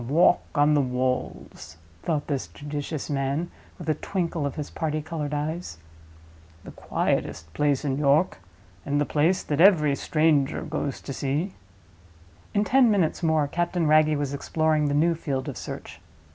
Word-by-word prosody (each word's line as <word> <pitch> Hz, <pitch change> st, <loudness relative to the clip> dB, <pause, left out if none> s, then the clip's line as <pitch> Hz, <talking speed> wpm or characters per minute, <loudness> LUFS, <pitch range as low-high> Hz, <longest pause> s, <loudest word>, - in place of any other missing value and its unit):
"The -, -, -8 dB
Walk 175 Hz, +2 st, +5 dB
on 145 Hz, 0 st, +4 dB
the 145 Hz, -, +4 dB
Walls," 125 Hz, -, -3 dB, 0.2 s
thought 150 Hz, -3 st, -1 dB
this 140 Hz, -3 st, -2 dB
judicious 145 Hz, 0 st, -5 dB
man, 140 Hz, +4 st, -1 dB, 0.3 s
with 170 Hz, -, -9 dB
a 155 Hz, -, +3 dB
twinkle 165 Hz, -2 st, -2 dB
of 140 Hz, -, -6 dB
his 150 Hz, -, -5 dB
party 155 Hz, -1 st, -2 dB
colored 155 Hz, -1 st, -4 dB
eyes. 150 Hz, -, -3 dB, 0.9 s
"The -, -, -10 dB
quietest 80 Hz, 0 st, -2 dB
place 145 Hz, -, +1 dB
in 135 Hz, -1 st, -1 dB
York; 145 Hz, -, +2 dB, 0.4 s
and 145 Hz, +1 st, 0 dB
the 145 Hz, -, +2 dB
place 165 Hz, +7 st, +1 dB
that 150 Hz, +1 st, 0 dB
every 160 Hz, -7 st, +6 dB
stranger 155 Hz, -2 st, +1 dB
goes 140 Hz, -2 st, -3 dB
to 140 Hz, -, -6 dB
see." 145 Hz, +9 st, -2 dB, 1.0 s
In 205 Hz, -, +3 dB
ten 250 Hz, +4 st, +4 dB
minutes 190 Hz, -7 st, +1 dB
more 160 Hz, -3 st, +2 dB
Captain 175 Hz, +2 st, -1 dB
Wragge 155 Hz, 0 st, +4 dB
was 145 Hz, -1 st, -2 dB
exploring 155 Hz, +1 st, +1 dB
the 145 Hz, -, 0 dB
new 165 Hz, +3 st, +3 dB
field 140 Hz, -5 st, -3 dB
of 140 Hz, -, -4 dB
search. -, -, -8 dB
150 Hz, 160 wpm, -25 LUFS, 140-165 Hz, 1.0 s, every